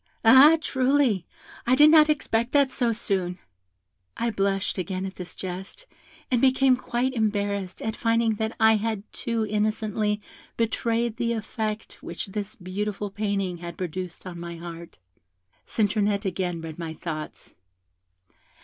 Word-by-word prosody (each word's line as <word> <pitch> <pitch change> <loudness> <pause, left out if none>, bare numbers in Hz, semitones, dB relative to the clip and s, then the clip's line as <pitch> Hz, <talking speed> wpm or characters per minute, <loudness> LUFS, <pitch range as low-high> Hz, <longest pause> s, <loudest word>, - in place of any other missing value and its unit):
Ah! 270 +8 +9
truly, 260 - +1 0.4
I 255 - +5
did 300 +3 +7
not 310 -1 +7
expect 240 -5 0
that 280 -2 +4
so 240 -3 +1
soon.' 190 -5 -1 0.8
I 235 0 0
blushed 195 -1 0
again 185 +1 -3
at 190 - -6
this 180 -2 -8
jest, 190 - -7 0.5
and 245 -2 +3
became 265 0 +5
quite 250 +1 -1
embarrassed 205 -4 -1
at 220 0 -2
finding 230 -1 +2
that 220 +1 -2
I 220 0 +6
had 215 -1 -2
too 230 -3 -1
innocently 210 0 0 0.4
betrayed 230 0 0
the 235 -1 0
effect 220 -1 -4
which - - -5
this 205 +1 -5
beautiful 205 +2 -4
painting 200 -3 -1
had 170 -1 -7
produced 180 0 -5
on 175 -2 -7
my 170 0 -6
heart. 170 0 -9 0.7
Citronette 205 -1 +1
again 180 -2 -2
read 160 0 -8
my 160 -1 -5
thoughts. 155 -3 -7
210 Hz, 140 wpm, -26 LUFS, 185-235 Hz, 0.8 s, Ah